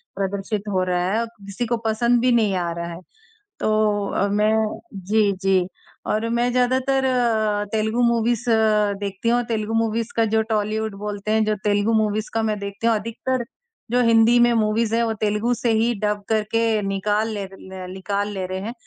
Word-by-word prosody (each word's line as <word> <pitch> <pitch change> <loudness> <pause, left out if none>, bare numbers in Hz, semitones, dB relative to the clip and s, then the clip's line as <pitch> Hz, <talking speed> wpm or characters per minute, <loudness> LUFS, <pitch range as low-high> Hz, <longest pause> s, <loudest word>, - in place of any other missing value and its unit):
प्रदर्शित 200 +2 -3
हो 185 0 +2
रहा 180 +1 0
है 225 - +2
और - - -1 0.2
किसी 200 +5 -3
को 235 +1 0
पसंद 235 +2 +2
भी 250 0 +3
नहीं 215 -5 +2
आ 170 - -2
रहा 170 0 -4
है। 170 - -8 0.6
तो 210 -2 +1
अ, 200 - 0
मैं 215 +1 +1
जी, 200 +2 +1
जी, 190 -2 +2 0.4
और 215 +2 0
मैं 240 +1 +1
ज़्यादातर 260 +2 +1
अ, 220 -5 +1
तेलुगु 220 +2 0
मूवीज़ 235 0 +1
अ, 215 -2 +3
देखती 200 +3 -2
हूँ 240 +1 +2
तेलुगु 215 0 -2
मूवीज़ 225 +1 -2
का 230 - +3
जो 220 - +4
टॉलीवुड 215 0 -1
बोलते 210 0 -4
हैं, 220 0 +3
जो 215 0 +1
तेलुगु 205 +2 +2
मूवीज़ 215 0 -2
का 225 - +1
मैं 210 -1 -2
देखती 200 +3 -3
हूँ 230 - +4
अधिकतर, 230 +3 -3 0.5
जो 250 - +3
हिंदी 230 +1 +5
में 240 0 +5
मूवीज़ 225 0 +1
हैं 235 - +2
वो 225 -1 0
तेलुगु 215 +3 +1
से 235 0 0
ही 230 +2 +2
डब 210 -1 0
करके 220 0 +1
निकाल 205 +3 0
ले 200 -2 -4
ले, 190 -1 -10
निकाल 200 +2 -2
ले 190 -1 -3
रहे 185 +1 -4
हैं। 225 +4 -5
215 Hz, 190 wpm, -22 LUFS, 205-230 Hz, 0.6 s, हिंदी